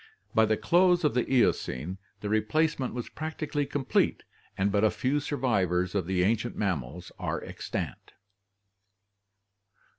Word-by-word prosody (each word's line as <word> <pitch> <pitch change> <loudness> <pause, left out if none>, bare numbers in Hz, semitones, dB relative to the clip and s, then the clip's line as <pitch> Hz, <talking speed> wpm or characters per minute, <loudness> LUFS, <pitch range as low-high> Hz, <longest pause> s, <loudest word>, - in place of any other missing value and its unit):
By 110 0 +5
the 110 0 +1
close 180 0 +4
of 150 - +3
the 125 +1 0
Eocene, 95 - +1 0.2
the 105 - -3
replacement 130 +6 +1
was 120 - -4
practically 155 -2 -3
complete 140 -2 +1 0.3
and 100 +1 +1
but 105 +1 +3
few 135 +3 0
survivors 100 - 0
of 95 -4 -1
the 90 -1 +1
ancient 115 +4 0
mammals 90 - -3
are - - -2
extant. - - -5
110 Hz, 125 wpm, -28 LUFS, 95-145 Hz, 0.3 s, By